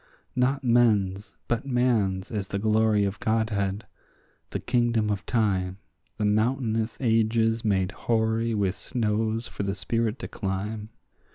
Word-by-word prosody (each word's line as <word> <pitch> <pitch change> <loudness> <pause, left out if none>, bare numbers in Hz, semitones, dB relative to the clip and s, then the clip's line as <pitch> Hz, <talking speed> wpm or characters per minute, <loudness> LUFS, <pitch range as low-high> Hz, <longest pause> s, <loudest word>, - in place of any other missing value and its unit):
Not 135 +3 +1
men's 105 -5 +2
but 120 +3 -1
man's 115 -7 +1
is 105 -4 -2
the 100 - -3
glory 110 0 +3
of 100 +1 -3
godhead, 110 -2 0 0.6
the - - -3
kingdom 120 -3 +1
of 100 -2 -3
time, 95 -5 0 0.4
The 105 - 0
mountainous 110 +1 +1
ages 115 -1 +2
made 95 -3 +1
hoary 115 0 0
with 100 -3 +1
snows 110 0 -1
for - - -6
the 100 0 -1
spirit 115 +3 -1
to - - -6
climb. 105 +1 -4
110 Hz, 130 wpm, -26 LUFS, 100-115 Hz, 0.6 s, glory